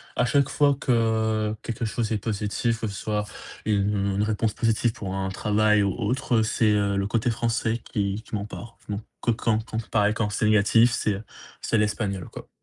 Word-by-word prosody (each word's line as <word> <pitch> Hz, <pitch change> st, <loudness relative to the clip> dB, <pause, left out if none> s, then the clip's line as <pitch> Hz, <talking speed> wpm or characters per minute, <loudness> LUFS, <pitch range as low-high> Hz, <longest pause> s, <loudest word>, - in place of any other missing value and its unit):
à -, -, +2 dB
chaque 140 Hz, +2 st, +3 dB
fois 145 Hz, -2 st, +3 dB
que 110 Hz, -3 st, +1 dB
quelque 115 Hz, 0 st, -4 dB
chose 110 Hz, 0 st, -2 dB
est -, -, +1 dB
positif, 110 Hz, +2 st, -1 dB
que 110 Hz, -, -2 dB
ce 100 Hz, -, -6 dB
soit 105 Hz, 0 st, -2 dB, 0.4 s
une 100 Hz, -1 st, +1 dB
une 105 Hz, -, +1 dB
réponse 110 Hz, 0 st, 0 dB
positive 115 Hz, 0 st, +1 dB
pour 95 Hz, -2 st, -5 dB
un 95 Hz, 0 st, -2 dB
travail 105 Hz, +1 st, +2 dB
ou 100 Hz, -, +1 dB
autre, 120 Hz, +1 st, 0 dB
heu, 110 Hz, -, +4 dB
c'est, 110 Hz, 0 st, +2 dB
heu, 100 Hz, -1 st, +2 dB
le 100 Hz, 0 st, 0 dB
côté 115 Hz, +2 st, 0 dB
français 115 Hz, 0 st, 0 dB
qui 100 Hz, +1 st, -1 dB
qui -, -, -6 dB
m'empare, 105 Hz, +3 st, -6 dB
donc 105 Hz, +1 st, -3 dB, 0.2 s
que 120 Hz, -, +2 dB
quand 110 Hz, 0 st, +1 dB
quand 110 Hz, -1 st, -3 dB
pareil, 105 Hz, 0 st, +3 dB
quand 110 Hz, -2 st, -1 dB
c'est 110 Hz, +2 st, -1 dB
négatif, 110 Hz, +3 st, +5 dB
c'est, 105 Hz, -, 0 dB
heu, 100 Hz, -, -7 dB, 0.4 s
c'est -, -, +1 dB
l'espagnol, 105 Hz, -3 st, -1 dB
quoi. -, -, -10 dB
110 Hz, 200 wpm, -25 LUFS, 105-115 Hz, 0.4 s, négatif